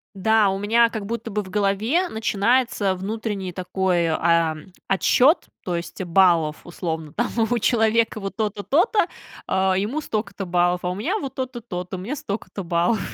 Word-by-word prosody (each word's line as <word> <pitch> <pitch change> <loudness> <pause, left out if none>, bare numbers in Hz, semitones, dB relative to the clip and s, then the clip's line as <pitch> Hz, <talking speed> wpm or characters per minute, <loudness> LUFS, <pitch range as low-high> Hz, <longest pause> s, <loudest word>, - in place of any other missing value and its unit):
Да, 220 +2 +3
у 195 0 0
меня, 230 +3 +4
как 215 -3 -5
будто 230 +1 -4
бы, 210 0 -2
в 185 - -11
голове 210 - +1
начинается 220 - +1
внутренний 200 -1 -4
такой, 180 -1 0
а, 165 0 +2 0.3
отсчет, 255 - +4 0.2
то 180 - -1
есть, 170 +2 -5
баллов, 170 -4 +3
условно, 160 -3 -4
там, 240 - -1 0.2
у 240 - +2
человека 225 -1 +2
вот 195 +3 -5
то-то, 210 -2 -2
то-то, 355 - +3 0.4
а, 190 0 +2
ему 215 +10 -1
столько-то 210 -7 -4
баллов. 175 0 +1
А - - +1
у - - -4
меня, 315 - -1
вот, 275 -8 -6
то-то, 255 -1 -4
то-то, 185 -5 -6
у - - -7
меня 225 +11 -4
столько-то 200 -5 -5
баллов. 175 +5 +1
200 Hz, 170 wpm, -23 LUFS, 180-230 Hz, 0.4 s, меня